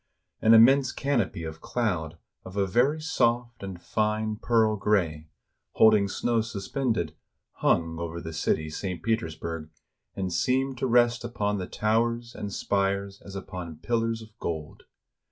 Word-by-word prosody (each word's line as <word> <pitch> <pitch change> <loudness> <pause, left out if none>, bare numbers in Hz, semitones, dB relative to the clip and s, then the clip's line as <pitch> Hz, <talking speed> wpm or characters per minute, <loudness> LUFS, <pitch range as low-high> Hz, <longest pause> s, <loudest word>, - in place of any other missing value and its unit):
An 110 +1 +7
immense 130 +3 +6
canopy 120 -11 -1
of 80 0 -7
cloud 90 -9 -2 0.3
of 95 +2 -9
a 100 - +3
very 125 +11 +2
soft 120 -6 0
and 95 -3 -6
fine 110 +2 -1
pearl 110 -1 +2
gray, 85 -7 0 0.4
holding 110 -2 +5
snow 115 +3 0
suspended, 110 - -2 0.4
hung 80 0 +1
over 85 0 -4
the 80 -1 -7
city 80 0 0
[St. 90 0 -4
Petersburg], 80 -7 -2 0.5
and 95 -2 -2
seemed 130 +3 +1
to 130 - 0
rest 120 -1 +3
upon 105 -3 -1
the 90 - -4
towers 115 +2 0
and 100 - -5
spires 100 0 -1
as 100 - -10
upon 90 -4 -6
pillars 115 +5 -1
of 110 - -14
gold. 80 -3 -5
105 Hz, 140 wpm, -27 LUFS, 85-115 Hz, 0.5 s, An